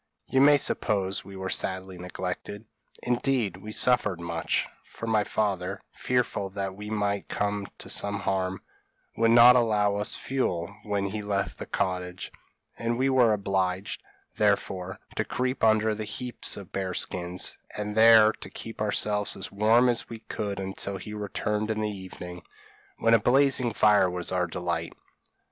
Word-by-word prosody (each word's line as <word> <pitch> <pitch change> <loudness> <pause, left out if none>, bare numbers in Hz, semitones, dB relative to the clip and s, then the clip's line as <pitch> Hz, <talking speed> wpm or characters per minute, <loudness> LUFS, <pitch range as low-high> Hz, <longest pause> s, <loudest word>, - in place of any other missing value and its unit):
You 130 - +2
may 145 +1 +7
suppose 100 -7 0
we 100 0 -11
were 95 0 -4
sadly 95 -1 -2
neglected; 90 +4 -5 0.4
indeed, 120 -6 0
we 105 +3 -9
suffered 105 -6 +2
much, 85 -1 -1 0.2
for - - -9
my 110 -2 +2
father, 100 -3 -1
fearful 125 -6 -1
that 95 -1 -4
we 105 +2 -8
might 100 -2 -1
come 100 -1 -2
to - - -10
some 100 0 -2
harm, 95 -1 -1 0.5
would 115 0 +3
not 120 +2 +8
allow 105 -4 +2
us 105 +3 +3
fuel, 100 -8 -2
when 100 -1 -1
he 105 +2 -3
left 100 -3 -2
the - - -6
cottage; 90 -2 -3 0.5
and 115 0 -1
we 135 +2 +2
were 125 -4 +5
obliged, 95 -1 -1 0.4
therefore, 95 -1 0 0.2
to - - +2
creep 130 +1 -2
under 110 0 +4
the 110 0 -4
heaps 125 +3 -3
of 100 -3 -10
bears' 95 -2 -1
skins, 90 0 -4 0.2
and 105 0 -3
there 110 -1 +8
to - - -10
keep 115 -1 -8
ourselves 105 0 +1
as - - -6
warm 110 +5 +4
as 120 -2 0
we 115 -1 -8
could 100 -3 -4
until 95 0 -4
he 105 +3 -8
returned 105 +1 -2
in 110 -1 -1
the 105 - 0
evening, 90 -2 -8 0.6
when 115 0 +3
a 115 - +7
blazing 130 +1 +3
fire 105 -3 +4
was 90 0 -1
our 90 -1 +1
delight. 90 +1 -3
105 Hz, 160 wpm, -27 LUFS, 95-110 Hz, 0.6 s, not